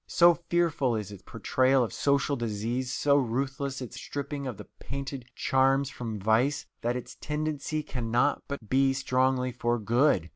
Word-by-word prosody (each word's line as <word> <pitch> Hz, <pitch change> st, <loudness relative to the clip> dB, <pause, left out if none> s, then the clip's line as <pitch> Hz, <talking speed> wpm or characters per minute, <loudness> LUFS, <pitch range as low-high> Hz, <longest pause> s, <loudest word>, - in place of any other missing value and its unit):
So 175 Hz, 0 st, +6 dB, 0.2 s
fearful 160 Hz, -8 st, +2 dB
is 105 Hz, -2 st, -4 dB
its 100 Hz, -2 st, -10 dB
portrayal 130 Hz, +6 st, +2 dB
of 115 Hz, -, -4 dB
social 140 Hz, 0 st, +1 dB
disease, 120 Hz, +2 st, -2 dB
so 145 Hz, -1 st, +3 dB
ruthless 135 Hz, +1 st, -1 dB
its 125 Hz, -, -8 dB
stripping 140 Hz, -1 st, -4 dB
of 120 Hz, -6 st, -5 dB
the -, -, -9 dB
painted 135 Hz, -2 st, -5 dB
charms 135 Hz, +1 st, +2 dB
from 115 Hz, -5 st, -5 dB
vice, 115 Hz, +8 st, +2 dB, 0.2 s
that 120 Hz, +1 st, 0 dB
its 125 Hz, 0 st, -6 dB
tendency 155 Hz, 0 st, -2 dB
cannot 125 Hz, 0 st, 0 dB
but 140 Hz, -6 st, -6 dB
be 135 Hz, +3 st, +3 dB
strongly 130 Hz, -1 st, +1 dB
for 120 Hz, 0 st, 0 dB
good. 120 Hz, -, +2 dB
130 Hz, 155 wpm, -28 LUFS, 120-140 Hz, 0.2 s, So